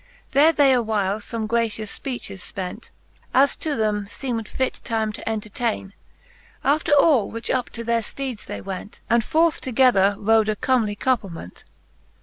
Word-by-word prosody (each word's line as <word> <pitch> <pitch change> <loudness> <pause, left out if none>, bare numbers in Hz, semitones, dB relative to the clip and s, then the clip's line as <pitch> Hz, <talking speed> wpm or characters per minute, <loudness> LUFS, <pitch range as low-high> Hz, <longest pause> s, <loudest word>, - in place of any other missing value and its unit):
There 295 +4 +6
they 285 -4 +4
awhile 215 -4 0
fome 220 +1 -4
gracious 220 -2 -1
fpeaehes 245 -7 -6
fpent, 190 +4 -6 0.5
As 275 +2 +5
to 310 -3 -2
them 210 -2 0
feemd 230 0 -4
fit, 260 -1 -2
time 220 -3 -1
to 225 - -5
entertaine. 215 -1 -3 0.7
After 305 +3 +1
all 280 -7 +5
which 230 0 -4
up 255 -2 0
to 230 - -6
their 235 0 +1
fteedes 255 0 -6
they - - -5
went, 195 +2 -7
And 235 0 +4
forth 320 +5 +2
together 230 -6 +3
rode, 220 +1 +3
a 215 - +1
comely 225 -3 +1
couplement. 200 - -3
225 Hz, 150 wpm, -23 LUFS, 210-260 Hz, 0.7 s, There